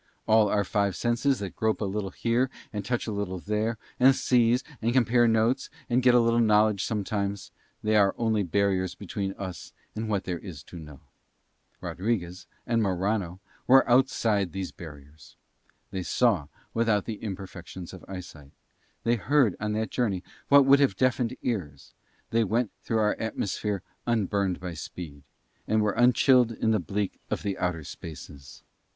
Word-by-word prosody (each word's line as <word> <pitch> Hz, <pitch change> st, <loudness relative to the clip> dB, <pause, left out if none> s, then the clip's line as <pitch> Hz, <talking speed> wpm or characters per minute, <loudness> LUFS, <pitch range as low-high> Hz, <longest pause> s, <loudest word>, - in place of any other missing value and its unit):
All 110 Hz, -1 st, +5 dB
our 105 Hz, 0 st, +2 dB
five 100 Hz, -1 st, 0 dB
senses 120 Hz, +6 st, +1 dB
that 95 Hz, -4 st, -5 dB
grope 110 Hz, 0 st, 0 dB
a 105 Hz, -, -1 dB
little 100 Hz, 0 st, -2 dB
here 120 Hz, +6 st, 0 dB, 0.2 s
and 105 Hz, -1 st, -3 dB
touch 120 Hz, +3 st, -1 dB
a 110 Hz, -, -3 dB
little 100 Hz, -3 st, -3 dB
there, 105 Hz, +4 st, -1 dB, 0.2 s
and 130 Hz, +1 st, +6 dB
seize, 125 Hz, 0 st, +3 dB, 0.2 s
and 115 Hz, +1 st, +1 dB
compare 120 Hz, -1 st, +4 dB
notes, 115 Hz, +4 st, +2 dB, 0.2 s
and 125 Hz, +2 st, +3 dB
get 125 Hz, -1 st, +5 dB
a -, -, +7 dB
little 115 Hz, 0 st, +3 dB
knowledge 105 Hz, -3 st, +3 dB
sometimes, 100 Hz, -2 st, -2 dB, 0.3 s
they 110 Hz, 0 st, +2 dB
are 100 Hz, -2 st, +4 dB
only 110 Hz, -2 st, +1 dB
barriers 95 Hz, 0 st, 0 dB
between 100 Hz, 0 st, -4 dB
us 95 Hz, -5 st, -7 dB, 0.2 s
and 110 Hz, 0 st, -3 dB
what 100 Hz, -2 st, 0 dB
there 90 Hz, -2 st, -3 dB
is 80 Hz, -8 st, -9 dB
to 85 Hz, -, -10 dB
know. 75 Hz, -3 st, -12 dB, 0.8 s
Rodriguez 90 Hz, -3 st, -3 dB, 0.2 s
and 115 Hz, -1 st, +1 dB
Morano 95 Hz, -1 st, -1 dB, 0.3 s
were 135 Hz, +1 st, +6 dB
outside 110 Hz, -7 st, +2 dB
these 95 Hz, -1 st, -4 dB
barriers. 75 Hz, -2 st, -13 dB, 0.6 s
They 95 Hz, -, -3 dB
saw 95 Hz, -, +1 dB, 0.3 s
without 115 Hz, -3 st, +1 dB
the 110 Hz, -3 st, -5 dB
imperfections 95 Hz, -3 st, -7 dB
of 95 Hz, -, -11 dB
eyesight; 80 Hz, -7 st, -9 dB, 0.5 s
they 120 Hz, +1 st, +2 dB
heard 125 Hz, -1 st, +2 dB
on 105 Hz, 0 st, -2 dB
that 110 Hz, +1 st, -2 dB
journey 100 Hz, -7 st, -1 dB, 0.2 s
what 140 Hz, -1 st, +7 dB
would 140 Hz, +1 st, +6 dB
have 135 Hz, -9 st, +3 dB
deafened 130 Hz, -1 st, +1 dB
ears; 80 Hz, -, -4 dB, 0.4 s
they 115 Hz, 0 st, +3 dB
went 115 Hz, +2 st, 0 dB
through 115 Hz, -, -1 dB
our 105 Hz, -1 st, +3 dB
atmosphere 105 Hz, -2 st, -2 dB, 0.2 s
unburned 100 Hz, -5 st, 0 dB
by 90 Hz, -1 st, -5 dB
speed, 75 Hz, -2 st, -8 dB, 0.5 s
and 110 Hz, -, +2 dB
were 105 Hz, -, +2 dB
unchilled 125 Hz, +1 st, +4 dB
in 110 Hz, 0 st, 0 dB
the 110 Hz, -, +2 dB
bleak 100 Hz, +3 st, -3 dB
of -, -, -2 dB
the 100 Hz, -1 st, -1 dB
outer 90 Hz, -3 st, -1 dB
spaces. 70 Hz, -2 st, -10 dB
105 Hz, 165 wpm, -27 LUFS, 95-115 Hz, 0.8 s, a